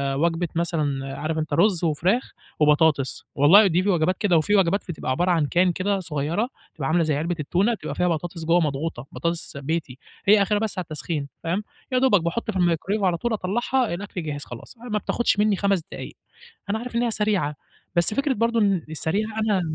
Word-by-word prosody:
وجبة 165 +4 +1
مثلًا 145 -5 -1
عارف 155 +1 -2
أنت 155 -2 -2
رز 175 +2 +3
وفراخ 175 - +1 0.3
وبطاطس، 150 -2 +2
والله 165 +10 +7
ودي 180 -1 +2
في 205 - 0
وجبات 180 0 +2
كده، 185 -5 +3
وفي 205 +7 +2
وجبات 195 0 +2
ف - - -31
بتبقى 145 -5 -4
عبارة 175 +8 +1
عن 165 -4 +2
can 180 -1 +4
كده 195 +1 0
صغيّرة، 170 - -2 0.2
بتبقى 140 -4 -4
عاملة 170 +1 +3
زي 155 -2 +1
علبة 170 +4 -1
التونة، 185 +10 +1
بتبقى 225 - -5
فيها 180 - +1
بطاطس 165 0 -3
جوه 170 +2 +4
مضغوطة، 145 -4 -2
بطاطس 170 +4 -3
بيتي، 140 -2 -3 0.3
هي 210 0 +7
آخرها 205 +1 +2
بس 215 -3 -3
على - - -2
التسخين، 155 -2 -4 0.2
فاهم؟ 180 +5 -1 0.3
يا 255 - +2
دوبك 250 -8 +4
باحط 175 +7 -2
في 195 - -4
الميكروويف 180 +4 +1
على 180 -3 +2
طول 240 +5 -1
أطلّعها، 235 +4 0
الأكل 185 -1 -5
جهز 145 -2 -4
خلاص، 120 - -10
ما 230 -2 -3
بتاخدش 235 0 0
مني 210 -1 +3
5 195 -2 +1
دقايق. - - -7 0.6
أنا 215 - 0
عارف 240 +1 -6
إن 235 - +2
هي 235 - +1
سريعة، 205 -9 0 0.4
بس 170 +5 +3
فكرة 275 +3 +1
برضو 230 +1 +1
إن 195 -5 +2
السريعة 185 +7 -1
أنا 210 -3 +2
175 Hz, 200 wpm, -24 LUFS, 155-205 Hz, 0.6 s, والله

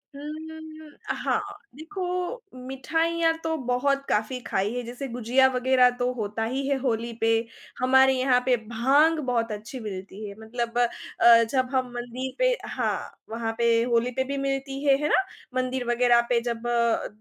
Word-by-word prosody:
उम, 285 - -9
हुँ, 315 +2 -7 0.3
हुँ। - - -17 0.2
अ, - - +2
हाँ, - - +1 0.3
देखो 350 +6 -6 0.6
मिठाइयाँ 325 +5 +1
तो 320 0 0
बहुत 275 +3 +1
काफ़ी 220 +4 0
खाई 195 +3 0
है 245 - -1
जैसे 245 +4 -6
गुझिया 245 +2 +3
वग़ैरह 250 0 +4
तो 250 +1 +1
होता 220 -1 -3
ही 265 +4 -2
है 280 -1 +1
होली 235 -2 -1
पे, 225 - +3 0.5
हमारे 265 +1 +5
यहाँ 255 -1 +3
पे 255 -1 +4
भांग 280 +8 +3
बहुत 230 -2 0
अच्छी 215 +5 -6
मिलती 200 0 -7
है 200 - -9
मतलब 235 +1 -4
अ, 235 -1 +4
जब 255 -2 +1
हम 255 -1 0
मंदिर 245 +2 -5
पे - - +4 0.2
हाँ, - - -3
वहाँ 225 0 -3
पे 235 0 +3 0.2
होली 235 +2 +2
पे 260 +2 -1
भी 280 +1 -4
मिलती 270 +1 -3
है, 275 -1 +5
है 300 - +1
ना? 385 - +4 0.4
मंदिर 255 -1 -2
वग़ैरह 240 0 +4
पे 240 -1 +3
जब 235 +1 -5
अ, 235 -1 +1
250 Hz, 175 wpm, -26 LUFS, 235-275 Hz, 0.6 s, हमारे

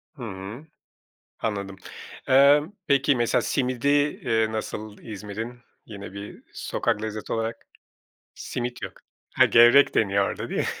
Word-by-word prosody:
Hımm. 115 +2 -8 0.7
Anladım. 100 -3 -3 0.5
Eee, 140 +2 +6 0.3
peki, 140 0 +3
mesela 120 -1 +1
simidi, 130 -1 -1
eee, 130 -6 +1
nasıl 110 -1 -5
İzmir'in 110 +3 -7 0.3
yine 100 -3 -9
bir 100 +1 -9
sokak 105 - -2
lezzeti 110 -1 -4
olarak? 115 0 -3 0.7
Simit 120 0 -5
yok. - - -5 0.4
Ha, - - +6
gevrek 120 +5 +6
deniyor 100 -2 +2
orada, - - -5
değil - - -2
mi? - - 0
115 Hz, 120 wpm, -25 LUFS, 105-130 Hz, 0.7 s, Eee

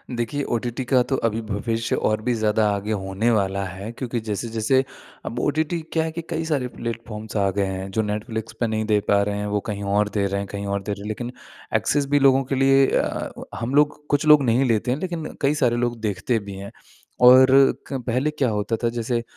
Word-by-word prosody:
देखिए 120 +5 -2
ओटीटी 120 +2 -3
का 130 0 +3
तो - - +3
अभी 115 0 -2
भविष्य 115 +2 -2
और 110 0 0
भी 125 +2 0
ज़्यादा 110 -1 +2
आगे 100 +2 -4
होने 95 +4 0
वाला 100 -3 0
है 95 +4 -7
क्योंकि 120 0 -4
जैसे-जैसे 115 +4 0 0.4
अब 120 - -4
ओटीटी 155 +4 0
क्या 160 - +2
है 160 - -3
कि 170 - -5
कई 160 0 -2
सारे 145 -6 0
प्लेटफ़ॉर्म्स 115 -2 -6
आ 100 -1 +2
गए 100 +1 0
हैं 95 0 -4
जो 110 - +1
नेटफ्लिक्स 110 +1 -4
पे 120 - +1
नहीं 110 0 -1
दे 105 -1 +3
पा 100 0 +4
रहे 100 0 -2
हैं 105 - -3
वो - - +2
कहीं 100 -1 -3
और 105 0 +2
दे 100 -2 +1
रहे 100 0 -2
हैं 100 - -6
कहीं 100 0 -4
और 100 - -2
दे 105 - -4
रहे 100 +1 -7
लेकिन 120 +3 -4 0.4
एक्सेस 145 -1 +1
भी 145 0 +4
लोगों 135 -1 +5
के - - +2
लिए 135 +1 +5
अ, - - -1 0.2
हम 120 +4 -3
लोग 150 0 +2
कुछ 145 +1 +1
लोग 150 -2 +7
नहीं 125 +2 +3
लेते 115 +2 0
हैं 130 - 0
लेकिन 170 -3 -4 0.2
कई 140 +1 +3
सारे 120 -1 +3
लोग 120 -1 -1
देखते 110 +3 -1
भी 95 - -6
हैं। 100 +1 -8 0.5
और 130 +1 +9 0.4
क 135 -2 -3
पहले 125 +5 +1
क्या 145 -4 0
होता 105 +1 -1
था 120 +1 0
जैसे 115 0 -2
115 Hz, 225 wpm, -23 LUFS, 105-130 Hz, 0.5 s, और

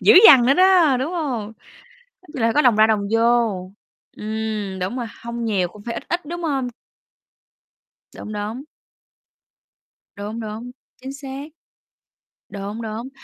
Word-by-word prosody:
dữ - - +6
dằn 245 -3 +8
nữa 275 - +5
đó, 360 -7 +5
đúng 300 +7 -2
hông? 250 -11 -3 0.7
Nói 365 - -21
chung 260 - -4
là 230 0 +2
có 300 - +4
đồng 245 -6 +4
ra, 215 +1 +6
đồng 205 -2 +1
vô, 225 -5 +2 0.5
ừm, 215 -3 -4
đúng 190 +8 -3
rồi, 240 -2 -3 0.2
hông 235 0 -4
nhiều 190 -5 +1
cũng 205 +3 -15
phải 230 - -4
ít - - -5
ít, 345 -1 -2
đúng 345 +3 -6
hông? 270 -5 -1 1.5
Đúng, 215 - -8
đúng. 215 +6 -5 1.5
Đúng, 210 +3 -6
đúng, 220 +3 -6 0.3
chính 265 +1 -6
xác. 275 0 -7 1.1
Đúng, 205 +3 -6
đúng, 225 +3 -5
230 Hz, 150 wpm, -21 LUFS, 210-270 Hz, 1.5 s, dằn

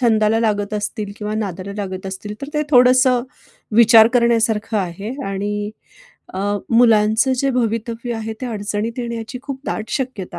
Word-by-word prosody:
छंदाला 220 -2 +3
लागत 210 -2 0
असतील 210 0 -4
किंवा 210 0 -4
नादाला 200 -2 -4
लागत 190 -2 -5
असतील, 195 +2 -6
तर 280 - -5
ते 300 - +1
थोडंसं 255 -1 +5 0.5
विचार 225 -1 +8
करण्यासारखं 225 -2 +2
आहे 195 +3 -4 0.2
आणि 205 +1 -3 0.6
अ, - - -4 0.3
मुलांचं 230 +1 +4
जे 275 +1 +1
भवितव्य 235 0 -2
आहे. 225 0 -4
ते 255 - -3
अडचणीत 215 +1 -3
येण्याची 235 0 -5
खूप 275 -2 -6
दाट 220 - -4
शक्यता 220 -10 -4
220 Hz, 145 wpm, -19 LUFS, 205-240 Hz, 0.6 s, विचार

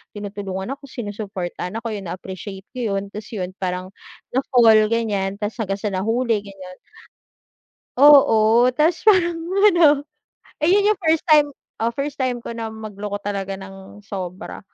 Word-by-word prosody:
tinutulungan 200 0 -5
ako, 275 0 -8
sinusuportahan 205 -6 -6
ako, 230 0 -4
yo'n 200 -4 -6
na-appreciate 190 +2 -7
ko 235 -6 -2
yo'n 195 0 -4
tapos 210 0 -8
yun 185 -2 -4
parang 185 0 -3 0.4
na 260 - +1
fall 225 -4 +5
gan'yan 205 -4 -1
tapos 210 +3 -5
hanggang 195 -2 -2
sa 210 - -1
nahuli, 225 +4 0
gan'yan. 195 -2 -11 1.3
Oo 245 -4 +6
ta's, 315 +6 +2
parang 355 -5 +4 0.3
ano, 305 -5 +4 0.6
eh, 305 - +1
yun 400 +3 +4
yung 425 - -2
first 320 -3 +1
time, 300 -3 +5 0.3
oh, 230 +1 -1
first 285 0 -4
time 250 -2 -1
ko - - -6
na 230 -1 -5
magloko 205 -1 -6
talaga 195 -1 -3
ng 195 +1 -12
sobra. 185 -3 -7
215 Hz, 150 wpm, -21 LUFS, 195-255 Hz, 1.3 s, Oo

